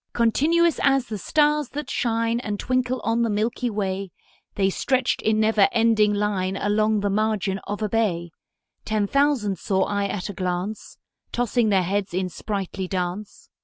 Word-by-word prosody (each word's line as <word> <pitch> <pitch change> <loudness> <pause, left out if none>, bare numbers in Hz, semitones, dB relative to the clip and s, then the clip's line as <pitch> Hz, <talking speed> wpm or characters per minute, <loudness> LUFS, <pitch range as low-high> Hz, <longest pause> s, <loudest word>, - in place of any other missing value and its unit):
Continuous 315 +8 +2
as 270 -2 +3
the 215 -3 -5
stars 300 - +2
that 295 -1 -5
shine 230 0 0
And 210 -4 -4
twinkle 255 0 0
on 230 +1 +1
the 230 - +1
milky 225 +4 -1
way, 195 -2 -3 0.5
The 195 -1 +2
stretched 260 +4 0
in 215 0 +1
never 215 -2 +4
ending 225 -2 +3
line 200 -2 -1
Along 215 +1 +1
the 205 - 0
margin 210 -2 0
of 205 +1 -3
a - - +1
bay: 180 -6 0 0.5
Ten 215 -1 0
thousand 250 - +1
saw 190 -1 +1
I 200 0 -1
at 190 -1 -4
a 205 - -6
glance, 185 +3 -4 0.3
Tossing 240 -1 +1
their 190 -3 +3
heads 195 0 -2
in 185 0 -1
sprightly 195 -1 -4
dance. 185 +2 -5
210 Hz, 165 wpm, -24 LUFS, 195-235 Hz, 0.5 s, never